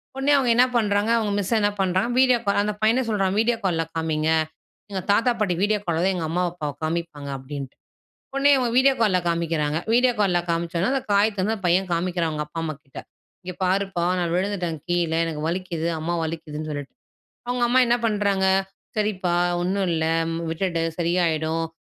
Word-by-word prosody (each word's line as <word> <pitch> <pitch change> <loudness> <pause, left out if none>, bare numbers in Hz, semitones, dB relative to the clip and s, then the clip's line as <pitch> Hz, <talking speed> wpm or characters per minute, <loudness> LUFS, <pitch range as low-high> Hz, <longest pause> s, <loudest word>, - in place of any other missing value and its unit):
உடனே 270 +2 +1
அவங்க 255 -3 +1
என்ன 250 - +6
பண்றாங்க? 210 0 +1
அவங்க 215 -2 0
மிஸ் 200 +3 -1
என்ன 205 - +3
பண்றாங்க? 185 +5 +1
வீடியோ 255 -2 +5
கால் 200 0 +3
அந்த 210 0 -1
பையனே 235 +4 +3
சொல்றான், 195 -2 0
வீடியோ 230 +1 +2
கால்ல 165 -3 +1
காமிங்க, 160 -1 0 0.6
எங்க 190 -1 -2
தாத்தா 230 +4 +3
பாட்டி 180 -5 +1
வீடியோ 210 0 +2
கால் 165 -1 0
தான் 190 +1 +2
எங்க 165 -3 -2
அம்மா 180 +3 0
அப்பாவ 150 -4 -4
காமிப்பாங்க 160 -3 -3
அப்டின்ட்டு, 135 0 -7 0.6
உடனே 280 +1 +4
இவங்க 245 -2 0
வீடியோ 270 +1 +5
கால்ல 200 -5 +3
காமிக்கிறாங்க. 165 -2 0 0.2
வீடியோ 250 0 +4
கால்ல 180 -3 +2
காமிச்சதும் 170 +5 -1
அந்த 270 - 0
காயத்த 200 0 +2
வந்து 220 - +1
அந்த 195 - -7
பையன் 185 +2 +2
காமிக்கிறான், 170 -1 0
அவங்க 150 0 -3
அப்பா 165 +2 -6
அம்மாகிட்ட. 155 -3 -7 0.4
இங்க 180 -1 -6
பாருப்பா! 190 -2 0
நான் 170 -1 -1
விழுந்துட்டேன் 180 -4 -2
கீழ, 175 -2 +1
எனக்கு 155 -2 -4
வலிக்குது, 170 -2 -3
அம்மா 170 +2 -2
வலிக்குதுன்னு 155 -1 -5
சொல்லிட்டு. 145 -1 -6 0.6
அவங்க 245 -1 +1
அம்மா 255 +1 +4
என்ன 240 +1 +3
பண்றாங்க? 200 -3 +1 0.5
சரிப்பா 190 -4 0 0.3
ஒண்ணும் 190 +1 0
இல்ல 160 -1 0 0.5
விட்டுடு, 165 0 -1 0.2
சரியாய்டும். 165 -2 0
180 Hz, 175 wpm, -23 LUFS, 165-205 Hz, 0.6 s, என்ன